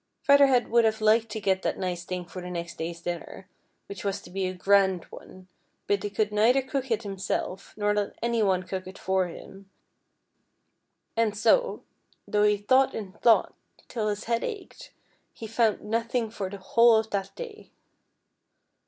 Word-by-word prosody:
'' - - -53
" - - -53
Feather 280 0 +6
Head 250 -3 +2
would 235 0 +5
have 220 0 +1
liked 220 +1 +3
to 220 - -4
get 190 -2 +1
that - - -2
nice 180 -2 -3
thing 180 -1 -4
for 180 +1 -8
the 180 - -7
next 170 -1 -6
day's 170 +1 -5
dinner, 175 +2 -6 0.4
which 200 -3 -8
was 200 -1 -1
to - - -13
be 190 0 -1
a - - -2
grand 190 -1 +3
one; 185 0 -13 0.4
but 200 -1 +1
he 205 - -3
could 210 +1 -1
neither 235 +6 +3
cook 265 0 -3
it 225 0 0
himself 195 -1 -4
nor 205 0 +1
let 205 -1 -2
any 235 -1 0
one 190 -3 +2
cook 185 0 -5
it 185 - -10
for 190 -1 0
him, 195 +3 -12 1.5
and 225 -2 +1
so, - - +2 0.4
though 210 - +1
he 210 0 +4
thought 260 +6 +3
and 200 -2 -8
thought 230 -2 +4 0.3
till 220 -3 -2
his 210 0 -2
head 230 0 -1
ached, 410 -5 -7 0.4
he 225 - -9
found 225 -1 +2
out - - -18
nothing 230 +1 -1
for 200 -4 -4
the 200 - -7
whole 230 +4 +4
of 220 0 0
that 195 -1 -2
da\'. 470 -4 -9
210 Hz, 190 wpm, -27 LUFS, 190-230 Hz, 1.5 s, Feather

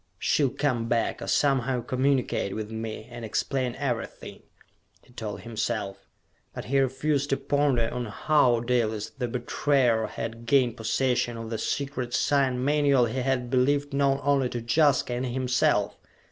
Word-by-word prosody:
"She'll 140 +8 +2
come 125 -4 -1
back, 115 -1 0
or - - -5
somehow 130 -3 +1
communicate 130 -5 0
with 110 0 -5
me, 110 0 -5
and 120 -1 -8
explain 125 +3 -1
everything," 125 -5 -4 0.6
he 125 - -22
told 110 -4 -6
himself. 110 -3 -4 0.5
But - - -6
he 135 +5 +1
refused 140 +2 0
to 135 - +1
ponder 140 -5 +1
on 125 -1 -3
how 125 +1 +2
Dalis 115 -3 -1
the 125 -2 -4
betrayer 120 -1 +1
had 115 +1 -6
gained 125 -3 +3
possession 120 +1 0
of 115 0 -7
the 110 - -2
secret 130 -1 -2
sign 130 -3 +1
manual 140 -3 +3
he 120 +3 -3
had 125 -1 -1
believed 140 +2 +1
known 140 0 +2
only 140 -3 +2
to 120 - -4
Jaska 140 -2 +3
and 120 +1 -2
himself. 125 0 +1
125 Hz, 150 wpm, -26 LUFS, 115-140 Hz, 0.6 s, gained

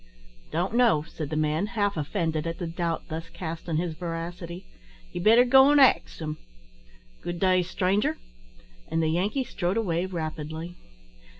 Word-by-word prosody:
"Don't 175 +6 -1
know," 235 -11 +4
said 155 -2 -6
the 155 - -3
man, 155 +5 +1
half 205 -1 +1
offended 160 0 -1
at 165 - -3
the 175 - -4
doubt 165 0 -2
thus 165 +1 -5
cast 165 -1 -6
on 160 - 0
his 170 0 -1
veracity; 170 +2 -6 0.5
"ye 175 - -4
better 230 +6 +6
go 265 +2 +7
an' 290 - +5
ax 270 -2 +4
him. 155 -1 -4 0.8
Good 175 0 -4
day, 185 -1 +4
stranger;" 185 +3 0 0.7
and 165 0 0
the 160 - +2
Yankee 200 - 0
strode 185 -4 -2
away 180 -5 0
rapidly. 160 -1 -5
170 Hz, 160 wpm, -27 LUFS, 160-190 Hz, 0.8 s, go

